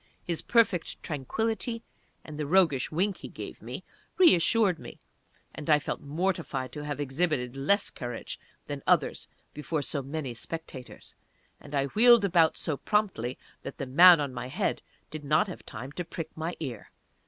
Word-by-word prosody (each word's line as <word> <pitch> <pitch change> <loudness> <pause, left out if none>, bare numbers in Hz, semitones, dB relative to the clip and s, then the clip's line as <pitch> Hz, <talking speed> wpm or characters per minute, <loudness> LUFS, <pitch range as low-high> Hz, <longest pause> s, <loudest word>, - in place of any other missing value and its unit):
His 170 -2 -2
perfect 220 -8 +1
tranquility, 225 - -2 0.4
and 155 -1 -8
the 150 - -2
roguish 160 -7 +3
wink 190 +5 0
that - - -19
he - - -6
gave - - -8
me, - - -7 0.3
reassured 205 - +5
me, - - -10 0.6
and 150 - -7
I 150 - +7
felt 145 - -4
mortified 155 -4 -2
to 150 - -6
have 145 -1 -4
exhibited 140 -3 -1
less 195 +10 +2
courage 120 -2 -6 0.3
than - - -5
others - - +2 0.3
before 150 0 -3
so 140 0 -2
many 135 -1 -4
spectators, 130 0 -8 0.5
and 145 0 -8
I 140 -1 +2
wheeled 230 - +6
about 170 -4 +3
so 150 -3 -2
promptly 190 - 0 0.2
that 135 - -8
the 135 - -3
man 170 +6 +8
on 140 -3 -2
my 125 0 -5
head 130 - -1 0.3
did 155 -1 -6
not 155 +6 +3
have 185 - -9
time 125 +3 -7
to 175 - -4
prick 165 -1 -7
my 160 +2 -3
ear. 125 -9 -6
155 Hz, 165 wpm, -28 LUFS, 135-180 Hz, 0.6 s, man